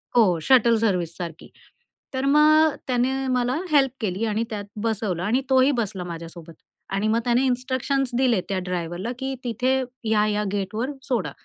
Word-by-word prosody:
हो, 190 -8 +4
शटल 235 +3 +4
सर्व्हिससारखी. 175 -5 -2 0.6
तर 260 +1 -1
मग 305 +1 +5
त्याने 265 +1 0
मला 250 0 +1 0.2
हेल्प 275 -3 +4
केली. 205 +1 -1
आणि 220 +1 0
त्यात 210 -3 -5 0.2
बसवलं 210 -6 -1
आणि 230 +7 +1
तोही 265 +1 +5
बसला 195 -4 -4
माझ्यासोबत. 170 -1 -9 0.4
आणि 195 +2 -1
मग 225 +1 +2
त्याने 245 +2 +2
इन्स्ट्रक्शन्स 260 +1 0
दिले 250 -5 +3
त्या 195 -1 0
ड्रायव्हरला 180 +4 -3
की 265 0 -3
तिथे 250 +3 0 0.3
या-या 210 -1 +2
गेटवर 210 +6 -2
सोडा 230 - -1
230 Hz, 145 wpm, -24 LUFS, 195-260 Hz, 0.6 s, मग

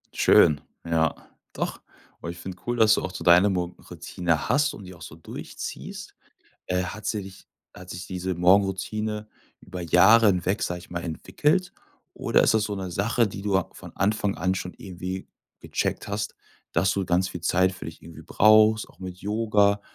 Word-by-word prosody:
Schön, 75 -1 +5 0.2
ja 80 -2 +1 0.4
doch. - - -4 0.4
Und 85 - -5
ich 85 - -7
finde 90 +1 -8
cool, 120 0 -1
dass 110 -1 +6
du - - +1
auch 95 - -4
so 85 - -6
deine 90 +4 +6
Morgenroutine 90 -2 -3
hast 145 0 +2
und 105 - -11
die 90 - -10
auch 85 - -16
so 80 - -9
durchziehst. 80 - -8 0.5
Äh, 90 0 0
hat 105 +3 -7
sich 95 -3 -5 0.3
hat 90 0 -12
sich 90 +1 -7
diese 95 0 -3
Morgenroutine 100 +4 +1 0.3
über 90 - -8
Jahre 95 +7 +6
hinweg, 95 +2 +1
sage 90 0 -2
ich 90 - -15
mal, 85 -1 -4
entwickelt 150 - 0 0.4
oder - - +2
ist - - +3
das 110 - +2
so 105 -1 -3
'ne 95 -2 -5
Sache, 115 +5 +1
die 95 - -8
du 100 -2 +1
a 95 - -2
von - - -12
Anfang 105 0 0
an 90 +2 0
schon 90 -1 -5
irgendwie 95 0 -6 0.3
gecheckt - - -2
hast, 100 0 -3 0.4
dass 95 +4 +2
du 95 0 -1
ganz 90 +1 +1
viel 90 - -7
Zeit 95 +2 +2
für 95 - -9
dich 80 - -9
irgendwie 85 -1 -12
brauchst, 110 +1 +4
auch - - -21
mit 90 -1 -7
Yoga 105 0 +2
95 Hz, 185 wpm, -25 LUFS, 90-105 Hz, 0.5 s, dass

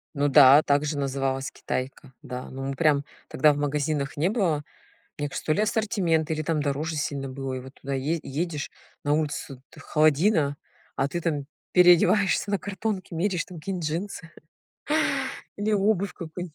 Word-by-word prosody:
Ну 145 +1 +2
да, 140 +1 +8
также 145 +1 +1
называлась- 135 -1 -1
китайка. 130 +1 -5
Да, 125 0 -7
ну 135 +1 -6
мы 135 - -3
прям 145 -1 +3 0.2
тогда 150 +2 +4
в - - -5
магазинах 145 0 -1
не 165 +5 +2
было, 180 -9 0 0.6
мне 145 0 -2
кажется, - - -6
то 155 - +3
ли 205 - +1
ассортимент, 200 -8 +1
или 155 0 -1
там 155 -1 0
дороже 150 +3 -2
сильно 140 -2 -2
было, 135 0 -5
и 130 - -4
вот 130 +2 -12
туда 140 0 -5
е 150 +5 -1
едешь, 150 +1 -3 0.3
на 145 - +1
улицу 145 -4 -3
т - - -14
холодина, 155 -1 +2 0.4
а 135 - +1
ты 170 - -3
там 150 -5 -2 0.3
переодеваешься 180 +3 +5
на 200 - +1
картонке, 195 -2 -4
меряешь 180 +1 0
там 180 -3 -10
какие-нибудь 175 0 -4
джинсы. 165 0 -5 1.3
Или 205 +2 -1
обувь 200 -1 +2
какую-нибудь. 170 -1 -7
155 Hz, 165 wpm, -26 LUFS, 140-175 Hz, 1.3 s, да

